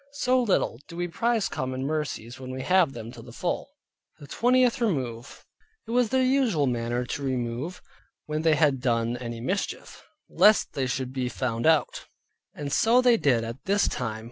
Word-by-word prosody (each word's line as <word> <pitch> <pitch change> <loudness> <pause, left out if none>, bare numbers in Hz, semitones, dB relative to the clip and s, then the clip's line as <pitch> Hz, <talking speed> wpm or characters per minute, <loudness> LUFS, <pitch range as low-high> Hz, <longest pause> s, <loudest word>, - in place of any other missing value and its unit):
So 255 -3 +2
little 195 - 0
do 170 - -10
we 175 +1 -2
prize 230 +3 0
common 130 0 -4
mercies 145 -6 -3
when 130 -1 -8
we 130 0 -5
have 180 -5 +3
them 115 -1 -8
to - - -11
the - - -12
full. - - -3 0.5
THE 145 - -12
TWENTIETH 250 - +2
REMOVE 130 - -3 0.4
It - - -7
was 245 -1 +2
their 260 +2 +2
usual 255 - +2
manner 120 0 -1
to 145 - -4
remove, 130 +5 -3 0.4
when 155 0 -2
they 160 -1 +3
had 145 -4 +2
done 115 -1 0
any 115 -1 -6
mischief, 185 +11 -4 0.2
lest 215 0 +4
they 135 -2 -1
should 130 0 -3
be 130 -2 -2
found 120 +1 -2
out; 160 -2 +2 0.5
and 145 -1 -4
so 235 +3 +4
they 250 -2 +5
did 125 - +2
at 115 +3 -7
this 200 +1 +2
time. 110 -1 -3
140 Hz, 180 wpm, -26 LUFS, 125-205 Hz, 0.5 s, they